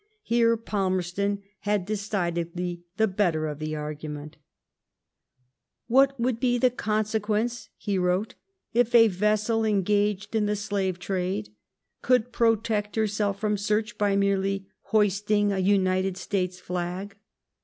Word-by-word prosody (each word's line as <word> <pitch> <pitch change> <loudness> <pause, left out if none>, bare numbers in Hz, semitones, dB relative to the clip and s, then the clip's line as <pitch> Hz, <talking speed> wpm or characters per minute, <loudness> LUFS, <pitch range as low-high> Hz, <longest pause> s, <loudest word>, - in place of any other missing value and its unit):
Here 230 0 +3
Palmerston 200 -1 -1 0.2
had 205 -3 0
decidedly 175 -4 -2
the 220 - +4
better 180 -6 +1
of 150 -1 -4
the 155 0 -3
argu 150 0 -5
ment: 150 +1 -7 0.8
— - - -59 0.7
What 270 +2 +4
would 235 -1 0
be 245 -1 +2
the 250 +1 +3
conseqaence 215 +1 -1
[he 200 -3 -1
wrote] 180 +4 0 0.4
if 240 +1 +2
a 230 -1 +8
Teasel 210 +3 +1
engaged 205 0 +1
in 210 -1 +2
the 210 - +1
Blaye 200 -3 -1
trade 180 - -2 0.5
could 250 -1 +2
protect 220 -3 +1
herself 210 -2 0
from 210 -1 0
search 210 +2 -1
by 205 -1 +2
merely 195 0 +1 0.2
hoisting 205 0 +2
a 195 - -1
United 190 -1 +2
States 185 -2 -2
flag 180 +3 -4
205 Hz, 130 wpm, -26 LUFS, 185-215 Hz, 0.8 s, a